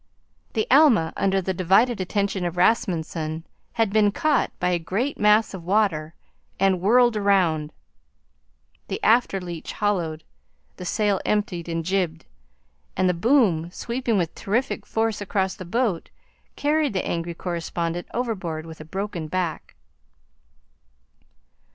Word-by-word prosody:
The 220 -2 0
Alma, 255 - +5
under 195 -1 +1
the 190 - -1
divided 195 +5 +3
attention 200 0 -1
of 175 0 -3
Rasmunsen, 165 -5 0 0.3
had 225 -4 0
been 210 -2 +4
caught 295 +4 +1
by 180 - +1
a 175 -1 +1
great 205 - -2
mass 210 +1 +4
of 185 -3 -7
water 175 -5 0 0.4
and 190 -2 +2
whirled 240 +4 +4
around. 180 -7 +2 1.2
The - - -3
after 230 -4 +3
leach 175 -3 -7
hollowed, 170 -7 -1 0.5
the 180 - -7
sail 205 +1 +1
emptied 185 -5 -1
and 165 -1 -2
jibed, 175 -3 -1 0.7
and 185 0 +3
the 180 - +3
boom, 180 - +2
sweeping 235 +3 -2
with 170 -3 -1
terrific 235 +7 -2
force 225 -2 -1
across 190 -1 -1
the 185 - -9
boat, 210 -2 -1 0.5
carried 295 -2 +1
the 185 - -1
angry 170 0 -3
correspondent 170 0 -3
overboard 190 -10 -3
with 160 -1 -10
a - - -9
broken 190 -1 -4
back. 175 0 -3
190 Hz, 130 wpm, -24 LUFS, 170-215 Hz, 1.2 s, Alma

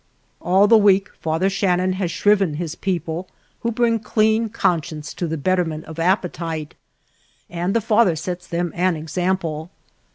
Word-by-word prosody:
All 190 +4 +4
the 225 +1 +7
week 195 -1 +3
Father 160 +4 0
Shannon 185 -1 +1
has 185 -2 -2
shriven 195 -1 +2
his 165 0 -4
people, 175 -1 -3 0.3
who 235 - -1
bring 230 0 +1
clean 220 +1 +1
conscience 160 -7 -1
to 175 - -3
the 160 0 -3
betterment 165 -1 -1
of 160 0 -9
appetite, 165 -3 -1 0.8
and 175 +4 -2
the 230 - +3
Father 215 -4 +3
sets 175 +3 -5
them 170 0 -2
an 180 0 +1
example. 160 0 -2
180 Hz, 150 wpm, -21 LUFS, 165-195 Hz, 0.8 s, the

